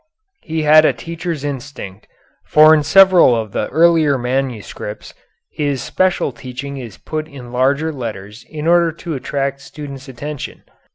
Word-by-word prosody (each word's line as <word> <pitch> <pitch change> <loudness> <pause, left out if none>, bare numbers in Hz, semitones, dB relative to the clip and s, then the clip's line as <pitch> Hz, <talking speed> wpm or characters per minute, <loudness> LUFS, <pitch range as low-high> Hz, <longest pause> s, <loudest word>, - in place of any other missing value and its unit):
He 160 -1 -3
had 155 +1 +7
a - - +3
teacher's 165 -2 -5
instinct, 135 -8 -7 0.4
for 155 +1 +6
in 155 - +4
several 185 -5 +6
of 110 -3 -3
the 105 - -2
earlier 160 -4 +3
manuscripts 125 -4 -4 0.4
his 145 -5 -2
special 185 -3 0
teaching 130 +3 -7
is 120 -6 -9
put 155 -1 -5
in 130 -5 -11
larger 140 +5 +1
letters 110 -4 -7
in 155 -1 -6
order 170 0 +4
to 165 0 -6
attract 140 0 -3
students' 140 -1 -9
attention.... 140 +3 -7
140 Hz, 145 wpm, -18 LUFS, 125-155 Hz, 0.4 s, had